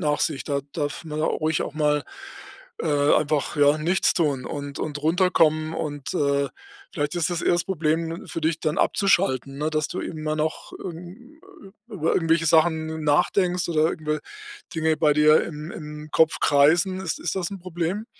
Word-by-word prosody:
nach 150 -3 0
sich. 150 -5 -1
Da 140 -2 -1
darf 145 +1 -3
man 155 -1 -4
ruhig 155 0 0
auch - - -6
mal, 150 -1 +1 0.8
äh, 145 -2 +2
einfach, 150 -1 0
ja, 145 +1 +5
nichts 175 +5 +2
tun 145 -6 0
und 145 -1 -6
und 145 -1 -4
runterkommen. 160 -2 +2
Und, 145 -4 -4
äh, 140 -1 +1 0.4
vielleicht 145 +2 -2
ist 175 0 0
das 175 -1 -2
eher - - +3
das 175 -1 +1
Problem 165 -2 -2
für - - -4
dich, 160 0 0
dann 155 -1 -1
abzuschalten, 140 -9 +1
ne, 155 +2 -1
dass 155 -1 -1
du 185 - -4
immer 155 -1 -3
noch, 155 +1 -3
hm, 185 - -10 0.5
über 180 -8 -1
irgendwelche 165 -1 +2
Sachen 160 0 +2
nachdenkst 180 +4 +2
oder 160 -1 +2
irgendwe 155 -2 -3 0.5
Dinge 160 -1 +1
bei 150 -1 +3
dir 150 +1 +5
im 155 0 -7
im 150 -1 -8
Kopf 160 -1 +3
kreisen. 160 +6 +3
Ist 170 -4 -3
ist 180 - -3
das 180 -3 -2
'n 195 -2 -7
Problem? 175 +4 -3
155 Hz, 170 wpm, -24 LUFS, 150-170 Hz, 0.8 s, ja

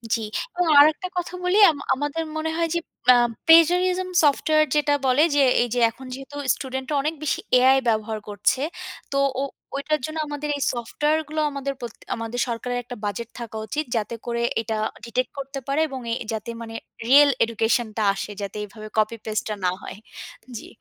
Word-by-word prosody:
জি, 225 - -3 0.4
এবং 355 -1 +2
আরেকটা 310 +5 +5
কথা 355 0 -3
বলি? 360 +3 +2
আম 295 - -8 0.2
আমাদের 290 +4 -2
মনে 320 0 -2
হয় 335 0 +1
যে, 340 - +1 0.3
অ্যা 250 - +9 0.3
প্লেজারিজম 360 +3 +5
সফটওয়্যার 310 +1 +3
যেটা 295 -1 +3
বলে 260 +3 +4
যে, 290 - +5 0.2
এই 240 - +1
যে, 245 - 0
এখন 240 +4 -12
যেহেতু 270 +2 -9 0.2
স্টুডেন্টরা 265 +2 -4
অনেক 305 +3 -1
বেশি 300 - 0 0.2
AI 260 +2 +6
ব্যবহার 220 0 0
করছে, 205 +5 +1 0.5
তো 275 - 0 0.2
ও - - 0 0.3
ওইটার 300 +2 0
জন্য 310 +1 -6
আমাদের 295 0 -4
এই - - -7
সফটওয়্যার 295 +6 0
গুলো 310 +1 -2
আমাদের 275 0 -3
প্রতি 235 -2 -7 0.2
আমাদের 230 +1 -5
সরকারের 245 +1 -3
একটা 245 +1 -8
বাজেট 210 +3 -4
থাকা 230 -2 -6
উচিত 300 +8 -3
যাতে 225 +1 -2
করে 235 -1 -2 0.2
এটা 220 -1 -3 0.3
ডিটেক্ট 240 +1 -2
করতে 275 0 -5
পারে 280 +3 +1
এবং 265 -2 -6
এ - - +1 0.2
যাতে 220 +1 -5
মানে 225 -1 -8 0.3
রিয়েল 285 +3 +7
এডুকেশন 230 +1 +1
টা 220 - +1
আসে, 210 - -5
যাতে 200 +1 -5
এভাবে 215 +1 -11
কপি 215 +1 +1
পেস্ট 215 +1 -1
টা 215 - -2
না 180 - +3
হয়, - - -8 0.6
জি। - - -9
265 Hz, 185 wpm, -23 LUFS, 230-300 Hz, 0.6 s, অ্যা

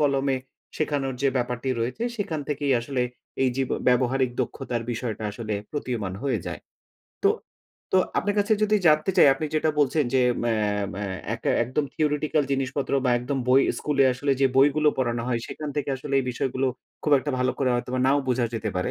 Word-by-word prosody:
কলমে 140 -2 +2 0.4
শেখানোর 140 -4 -1
যে 140 - +4
ব্যাপারটি 125 +1 -2
রয়েছে 125 - -2
সেখান 190 -8 -2
থেকেই 145 -1 0
আসলে 125 +1 -1 0.4
এই 130 - +3
যে 135 - +1
ব - - 0 0.2
ব্যবহারিক 125 +1 +2
দক্ষতার 125 -1 -3
বিষয়টা 115 -2 -4
আসলে 110 0 -4 0.2
প্রতীয়মান 120 -10 -3
হয়ে 135 -5 0
যায়। 90 - -5 0.6
তো - - +6 0.7
তো - - +6 0.2
আপনার 205 0 0
কাছে 205 +2 +2
যদি 215 0 +4
জানতে 155 +3 +4
চাই, - - +8
আপনি 145 - -4
যেটা 155 0 +2
বলছেন, 145 +1 +3
যে 130 - +5 0.2
ম্যা 120 - +2 0.4
ম্যা 100 +2 -4 0.3
একটা - - -2
একদম 140 +4 -1
theoretical 150 0 +1
জিনিসপত্র 135 +1 -2
বা 125 - +3
একদম 130 +3 -2
বই 130 +1 +6 0.2
স্কুলে 140 -2 +2
আসলে 140 +3 0
যে 135 - +6
বইগুলো 145 +3 +5
পড়ানো 120 -2 0
হয় 120 -2 +1
সেখান 150 -1 -6
থেকে 145 -2 -1
আসলে 140 +1 -4
এই 130 - 0
বিষয়গুলো 130 +2 -1 0.4
খুব 150 - +1
একটা 145 - -3
ভালো 125 - +2
করে 130 -2 +2
হয়তোবা 125 +1 -2
নাও 140 +2 +4
বোঝা 125 -1 +2
যেতে 110 -1 -2
পারে। 90 - -1
135 Hz, 185 wpm, -25 LUFS, 125-145 Hz, 0.7 s, চাই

